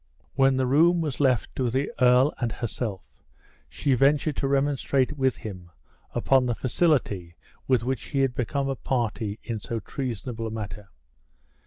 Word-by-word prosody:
When 135 0 +3
the 130 - +2
room 165 +7 +4
was 150 -5 -3
left 130 -5 +1
to 125 -2 +1
the 130 +4 -1
earl 125 +3 +5
and 120 -2 -1
herself, 110 -4 -4 0.7
she 140 -2 0
ventured 140 +3 +3
to 135 - 0
remonstrate 140 0 +1
with 130 -2 +1
him 90 -5 -8 0.5
upon 130 -2 +3
the 120 - 0
facility 115 - 0 0.3
with 130 -4 +3
which 125 -5 -2
he 135 +9 -1
had 135 -2 +1
become 135 +3 -1
a 135 - -1
party 110 -4 -2
in 115 -3 -4
so 115 +3 -4
treasonable 115 -2 -4
a - - -3
matter. 105 -1 -6
125 Hz, 160 wpm, -26 LUFS, 115-135 Hz, 0.7 s, earl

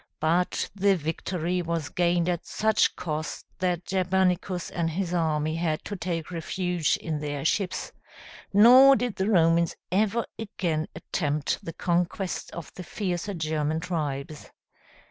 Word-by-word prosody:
But 170 +3 +1
the 200 0 +3
victory 170 +2 -2
was 165 -3 -2
gained 175 -1 +1
at 175 -2 -2
such 220 0 +2
cost 155 -1 -4
that 180 -2 0
Germanicus 185 -1 0
and 170 -1 -1
his 175 +2 -2
army 155 -2 0
had 160 -2 -1
to 205 - -4
take 170 -3 -3
refuge 175 -1 0
in 155 -2 -3
their 145 -1 -4
ships, 185 +2 0 0.6
nor 255 +7 +8
did 245 -2 -2
the 190 +2 0
Romans 170 -3 +3 0.2
ever 215 +4 +1
again 170 -7 -2
attempt 150 -3 -2
the 165 - -6
conquest 175 +2 -1
of 170 - -8
the 180 - -8
fiercer 190 +1 -3
German 155 -1 -1
tribes. 150 -4 -4
175 Hz, 135 wpm, -26 LUFS, 160-190 Hz, 0.6 s, nor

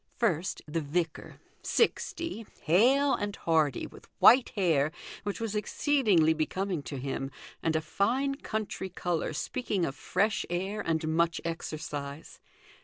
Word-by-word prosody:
First, 185 -7 0
the 165 +2 -1
vicar, 160 +2 -3 0.2
sixty, 335 - 0 0.2
hale 260 - +4
and 205 -1 -2
hearty, 155 -5 +1
with - - -13
white 250 +2 +7
hair, 160 -7 +2 0.3
which 205 -1 -4
was 225 -2 -2
exceedingly 210 - +3
becoming 175 +2 -1
to 140 - -4
him, 135 +1 -3 0.3
and 160 -1 0
a 160 - +2
fine 240 - 0
country 215 -7 -4
colour 175 -3 -2
speaking 195 - -1
of 135 - -3
fresh 205 +8 0
air 190 +4 -2
and 160 -1 0
much 165 +1 +2
exercise. 150 -3 -5
175 Hz, 130 wpm, -29 LUFS, 155-215 Hz, 0.3 s, white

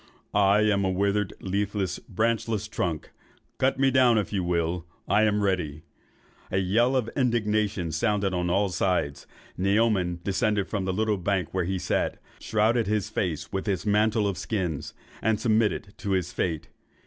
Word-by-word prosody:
I 100 +1 +4
am 105 -2 +2
a 95 - +1
withered, 100 +2 0
leafless, 100 -1 -2
branchless 110 0 -1
trunk; 85 -7 -3 0.5
cut 130 0 +2
me 135 0 +4
down 125 -3 +5
if 105 -1 -1
you 95 -2 0
will. 85 0 0 0.2
I 105 +2 +4
am 105 -1 +1
ready.' 80 -6 -1 0.7
A 95 - -1
yell 115 +8 +2
of 125 -4 +1
indignation 105 - 0
sounded 100 +2 0
on 90 -1 -1
all 100 +3 +2
sides. 90 -5 -1 0.3
Naoman 100 -3 +2
descended 100 0 0
from 100 -3 -2
the 95 - 0
little 110 +1 +1
bank 95 -1 -1
where 95 -2 0
he 95 +2 -1
sat, - - -1 0.2
shrouded 110 +1 +1
his 105 0 -1
face 90 -8 -2
with 95 +2 -3
his 95 -2 -1
mantle 105 +1 +2
of 95 -4 -2
skins, 90 - -3 0.3
and 110 -1 +1
submitted 110 -3 +1
to 100 -1 -2
his 90 -1 -1
fate. 80 -4 -2
100 Hz, 160 wpm, -26 LUFS, 90-110 Hz, 0.7 s, down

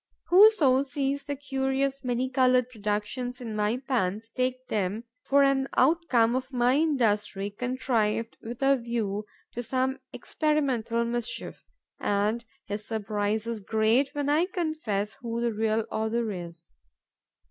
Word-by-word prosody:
Whoso 350 -9 +6
sees 280 0 -2
the 285 0 -3
curious, 270 0 -1
many 250 0 0
coloured 255 -1 +3
productions 215 +3 -3
in 230 -4 -5
my 210 +3 +1
pans 225 -5 -2
takes 255 0 -1
them 205 +2 -1 0.2
for 280 0 +4
an 270 -1 +2
outcome 255 -6 +3
of 260 +1 -3
my 245 -1 +3
industry, 210 -9 +1
contrived 230 -1 -1
with 235 +3 -6
a 275 0 +5
view 220 -4 -3 0.2
to 240 - -4
some 260 +2 -1
experimental 260 -7 0
mischief; 240 0 -3 0.4
and 210 +3 0 0.2
his 205 +1 -4
surprise 215 0 -2
is 230 -1 -3
great 220 +6 +2
when 290 -1 -1
I 310 +5 +3
confess 310 - -2
who 230 -1 -3
the 235 -1 0
real 220 0 0
author 220 +1 -1
is. 170 -3 -8
240 Hz, 135 wpm, -27 LUFS, 215-270 Hz, 0.4 s, Whoso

